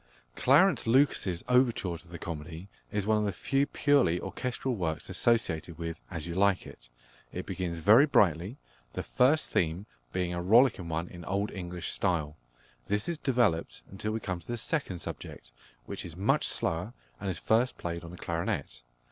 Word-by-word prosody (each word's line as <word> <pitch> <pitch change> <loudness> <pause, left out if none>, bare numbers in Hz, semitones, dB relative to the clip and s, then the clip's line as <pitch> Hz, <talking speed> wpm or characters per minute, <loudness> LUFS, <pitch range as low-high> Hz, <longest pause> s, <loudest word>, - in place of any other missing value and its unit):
+Clarence - - +4
Lucas's+ 115 -8 +2
overture 125 -8 +2
to 85 +2 -11
the 85 0 -8
comedy 80 +2 -7 0.2
is 105 -2 -1
one 110 0 +3
of - - 0
the 100 - 0
few 135 +9 0
purely 140 - +3
orchestral 125 +4 -3
works 80 -6 -3
associated 85 -8 +1
with 85 0 -5
As 80 -4 -5
You 85 - -4
Like 95 +1 +2
It. - - -13 0.4
It - - -5
begins 90 -3 -3
very 110 - +6
brightly, 95 - +2 0.4
the - - -3
first 140 +5 +2
theme 85 +4 0 0.3
being 90 +2 -1
a 85 - -2
rollicking 105 -2 +4
one 80 +2 -2
in 85 -1 -10
Old 100 +2 -1
English 90 -2 -4
style. 80 -6 0 0.5
This 105 +1 0
is 170 -3 -2
developed 110 - +1
until 100 +2 -3
we 110 - -2
come 95 -4 -3
to 85 - -18
the 120 - -3
second 115 - -2
subject, - - -8 0.3
which - - -5
is 85 -2 -8
much 95 +4 +2
slower, 90 +8 -2 0.3
and 100 - -3
is 90 - -2
first 115 +7 +1
played 85 0 -4
on 85 - -8
the 90 - -10
clarinet. 85 -8 -3
90 Hz, 175 wpm, -30 LUFS, 85-115 Hz, 0.5 s, very